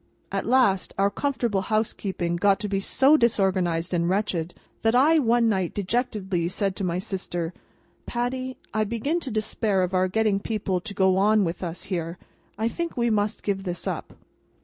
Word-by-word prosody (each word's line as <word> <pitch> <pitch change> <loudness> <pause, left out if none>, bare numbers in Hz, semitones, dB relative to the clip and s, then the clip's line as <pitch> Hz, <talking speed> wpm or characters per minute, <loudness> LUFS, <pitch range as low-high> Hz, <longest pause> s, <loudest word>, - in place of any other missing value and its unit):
At - - -2
last, 240 -7 +3
our 200 +1 +3
comfortable 240 -8 -1
housekeeping 195 -4 -1
got 195 +2 +3
to 210 - -2
be 195 -1 0
so 270 +9 +4
disorganised 185 - +1
and 170 0 +1
wretched, 185 -4 -1 0.3
that 225 +1 +2
I 310 +6 +5
one 235 -3 +3
night 190 -5 0
dejectedly 200 -4 -1
said 195 +1 -1
to 200 - -2
my 175 -1 0
sister: 180 -3 -3 0.5
"Patty, 255 +2 -2 0.2
I 215 - +2
begin 235 +10 -1
to 285 - -6
despair 215 -3 0
of 180 +1 -2
our 185 0 +3
getting 210 0 +1
people 200 -4 -2
to 200 +1 -7
go 190 -1 +3
on 210 +2 +4
with 170 -1 -3
us 170 -1 -4
here, 170 -2 -3 0.4
and 220 - -1
I - - +3
think 335 +5 -4
we 235 -1 +2
must 210 0 0
give 195 -2 -1
this 175 -2 -4
up." - - -4
200 Hz, 180 wpm, -25 LUFS, 185-230 Hz, 0.5 s, I